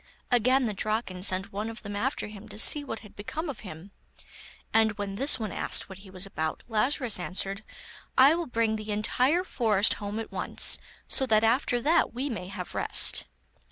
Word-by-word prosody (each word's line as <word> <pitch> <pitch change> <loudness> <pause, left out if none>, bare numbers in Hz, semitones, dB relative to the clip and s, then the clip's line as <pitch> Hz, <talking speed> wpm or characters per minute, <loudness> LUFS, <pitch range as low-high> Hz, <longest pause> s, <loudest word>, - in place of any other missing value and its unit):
Again 255 +2 +3
the 215 - -2
Draken 215 -2 -3
sent 190 0 +1
one 210 +3 -3
of 225 +1 -9
them 205 -1 -6
after 260 +7 -2
him 210 +1 -11
to 210 - -10
see 290 +6 +5
what 225 -5 -6
had 210 - -15
become 270 +10 -5
of 255 - -12
him, 180 0 -11 0.8
and 220 -1 +3
when 200 -1 -5
this 260 +5 +4
one 215 -4 -4
asked - - 0
what 190 0 -10
he 195 0 -14
was 185 0 -5
about, 160 -5 -4
Lazarus 240 0 +1
answered: 195 +3 -4 0.5
'I 270 +4 +7
will 340 -1 -3
bring 225 -3 0
the 215 0 -6
entire 255 - +1
forest 215 - +2
home 205 +1 -4
at 225 - -6
once, - - +3 0.3
so 265 - +2
that 215 -2 +3
after 245 +1 +2
that 320 -2 +2
we 270 +3 -3
may 180 -5 -6
have 185 -2 -7
rest. - - +3
220 Hz, 195 wpm, -27 LUFS, 200-250 Hz, 0.8 s, I